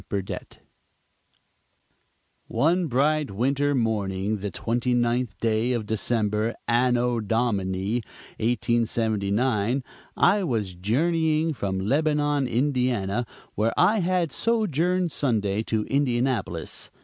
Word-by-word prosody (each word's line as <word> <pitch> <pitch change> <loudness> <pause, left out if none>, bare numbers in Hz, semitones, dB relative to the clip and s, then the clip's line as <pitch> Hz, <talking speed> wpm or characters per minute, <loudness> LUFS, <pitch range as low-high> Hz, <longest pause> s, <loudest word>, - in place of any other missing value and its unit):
BURDETTE 100 -2 -5 1.9
One 170 +3 +1
bright 150 +3 +1
winter 140 +7 0
morning, 105 -3 -1
the 100 +1 -4
twenty 120 +5 -1
ninth 120 -2 0
day 115 +2 +1
of 115 -3 -2
December, 110 0 0
Anno 120 0 +2
Domini 105 -2 0 0.4
1879, 115 +1 0 0.3
I 200 +2 +4
was 110 - -1
journeying 155 - +1
from 100 -7 -3
Lebanon, 145 +4 +1
Indiana, 120 -4 0 0.3
where 110 +2 0
I 210 +5 +4
had 180 -3 0
sojourned 180 - +1
Sunday, 110 -8 0
to 110 -1 -1
Indianapolis. 125 - -1
120 Hz, 95 wpm, -25 LUFS, 105-145 Hz, 1.9 s, I